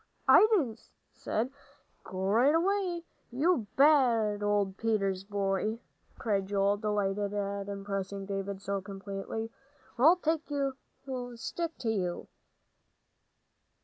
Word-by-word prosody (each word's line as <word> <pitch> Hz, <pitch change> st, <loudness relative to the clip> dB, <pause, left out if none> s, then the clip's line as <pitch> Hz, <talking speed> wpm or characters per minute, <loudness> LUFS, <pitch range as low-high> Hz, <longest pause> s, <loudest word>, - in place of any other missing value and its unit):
"I'd 430 Hz, -, +8 dB
'a' 240 Hz, -8 st, -2 dB, 0.4 s
said, 235 Hz, +5 st, -2 dB, 0.5 s
'Go 185 Hz, 0 st, -5 dB
right 240 Hz, +10 st, +4 dB
away, 360 Hz, -1 st, +1 dB, 0.3 s
you 270 Hz, -, +1 dB
bad 240 Hz, -8 st, +4 dB
old 205 Hz, -2 st, +1 dB
Peters 195 Hz, -4 st, 0 dB
boy.'" 200 Hz, +2 st, -1 dB, 0.4 s
cried 200 Hz, -4 st, 0 dB
Joel, 200 Hz, 0 st, +2 dB
delighted 205 Hz, -1 st, -1 dB
at 200 Hz, 0 st, -3 dB
impressing 195 Hz, 0 st, -4 dB
David 195 Hz, 0 st, -4 dB
so 200 Hz, -1 st, -2 dB
completely, 200 Hz, +3 st, -5 dB, 0.5 s
"'or 255 Hz, -, +4 dB
I'll 335 Hz, +3 st, +8 dB
take 320 Hz, -3 st, -1 dB
a 280 Hz, -2 st, 0 dB, 0.6 s
stick 330 Hz, +7 st, -4 dB
to 225 Hz, -, -1 dB
you.'" 180 Hz, -5 st, -2 dB
205 Hz, 115 wpm, -30 LUFS, 195-265 Hz, 0.6 s, I'd